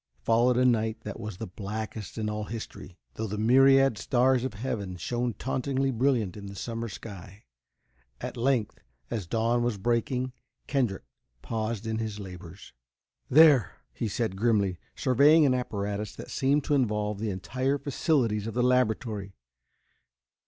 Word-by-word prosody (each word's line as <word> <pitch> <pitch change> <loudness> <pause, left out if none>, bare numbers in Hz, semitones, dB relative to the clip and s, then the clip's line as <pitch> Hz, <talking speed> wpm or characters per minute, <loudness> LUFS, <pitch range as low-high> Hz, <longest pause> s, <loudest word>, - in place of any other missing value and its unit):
Followed 120 +2 +3
a 125 - +4
night 110 -2 +1
that 105 +1 -7
was 110 -4 -6
the - - -5
blackest 105 +3 -6
in 110 -1 -1
all 105 0 -3
history, 105 -4 -8 0.2
though 110 - -4
the 105 +1 -4
myriad 135 +1 +5
stars 125 0 +2
of 130 -4 -3
heaven 100 -5 -4
shone 120 +5 -2
tauntingly 135 +3 -1
brilliant 120 -6 +1
in 100 -1 -8
the 100 - -8
summer 115 +4 -4
sky. 100 -1 -10 0.8
At - - -5
length, 120 -3 0 0.3
as 100 -7 -3
dawn 115 +4 +1
was 120 -3 0
breaking. 120 +4 -1 0.3
Kendrick 125 -9 0 0.4
paused 110 -1 -3
in 110 0 -2
his 110 -2 -4
labors. 90 -5 -10 0.6
"There!" 145 - +6 0.2
he 115 - -2
said, 110 -1 -2
grimly, 100 -4 +1 0.2
surveying 145 +5 +5
an 130 - +4
apparatus 105 -4 -3
that - - -9
seemed 140 +2 +2
to 145 - 0
involve 105 -6 0
the 110 0 -2
entire 130 +8 -1
facilities 125 -7 0
of 115 - -5
the 125 - +2
laboratory. 110 -5 0
115 Hz, 150 wpm, -28 LUFS, 105-125 Hz, 0.8 s, There